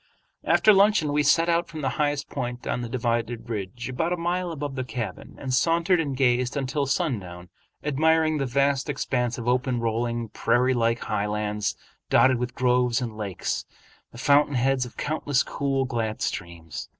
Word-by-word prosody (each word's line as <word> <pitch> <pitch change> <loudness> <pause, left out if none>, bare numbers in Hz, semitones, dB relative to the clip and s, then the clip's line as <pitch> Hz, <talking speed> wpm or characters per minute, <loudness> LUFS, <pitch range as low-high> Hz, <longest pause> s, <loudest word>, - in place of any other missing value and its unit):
After 215 - +5
luncheon 195 -7 +4
we 150 - +3
set 165 +4 +4
out 170 0 +2
for 165 -2 -8
the 135 -3 0
highest 145 -1 0
point 125 -2 -5
on 125 - -1
the 120 - -5
dividing 115 -1 -1
ridge 115 +1 -5
about 165 +7 -1
a 180 - 0
mile 175 +1 -1
above 145 -3 -4
the 130 -1 -3
cabin, 115 -2 -6
and 130 -2 -4
sauntered 170 +6 +3
and 140 -5 -2
gazed 125 0 +2
until 140 +1 -1
sundown, 100 - -2 0.3
admiring 155 +2 +2
the 135 - -1
vast 140 +2 +1
expanse 125 -4 -1
of 120 -1 -6
open 125 0 +1
rolling 115 0 -1
prairie 125 +4 +2
like 115 -1 +1
highlands 105 0 -2 0.3
dotted 130 -2 +4
with 125 0 -3
groves 125 -2 +2
and 120 -4 -4
lakes, 100 -4 -3 0.5
the - - -13
fountain 145 +2 +3
heads 130 0 +2
of - - -16
countless 145 -3 0
cool, 135 -1 -1
glad 115 -4 -2
streams. 85 -3 -5
130 Hz, 170 wpm, -25 LUFS, 115-145 Hz, 0.5 s, After